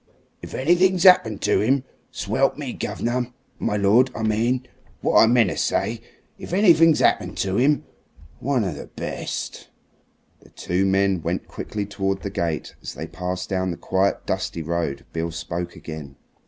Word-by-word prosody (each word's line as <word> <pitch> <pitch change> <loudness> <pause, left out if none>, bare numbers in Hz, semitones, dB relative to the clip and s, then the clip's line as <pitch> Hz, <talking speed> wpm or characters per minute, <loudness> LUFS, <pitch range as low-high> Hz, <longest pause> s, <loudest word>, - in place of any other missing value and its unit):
If - - -8
anything's 175 +5 +3
happened 145 - +6
to 105 - +2
'im! 130 +5 +2 0.3
Swelp - - 0
me! - - -4
gov'ner 125 +1 -2 0.3
my 105 - 0
lord, 105 +6 +4
I 110 - -3
mean. 115 +4 +1 0.4
What - - +4
I 115 - +6
meanter 115 -8 +3
say, 115 0 -1 0.4
if - - -7
anything's 165 -5 +5
'appened - - +2
to 95 +2 0
'im! 145 +3 +3 0.6
One 130 -2 +1
of 95 - -2
the - - -8
best!" - - -5 0.7
The - - -20
two 95 +2 -1
men 95 -2 +2
went 85 +3 -3
quickly 105 -1 -5
towards 95 -1 -2
the 100 - -4
gate. 85 -5 -2
As - - -7
they 80 - -5
passed 90 +2 -4
down 95 -1 -1
the 85 - -4
quiet, 95 +1 0
dusty 85 - -2
road 80 -3 -2
Beale 85 0 -2
spoke 85 +2 -5
again. 75 -4 -8
100 Hz, 160 wpm, -23 LUFS, 90-125 Hz, 0.7 s, happened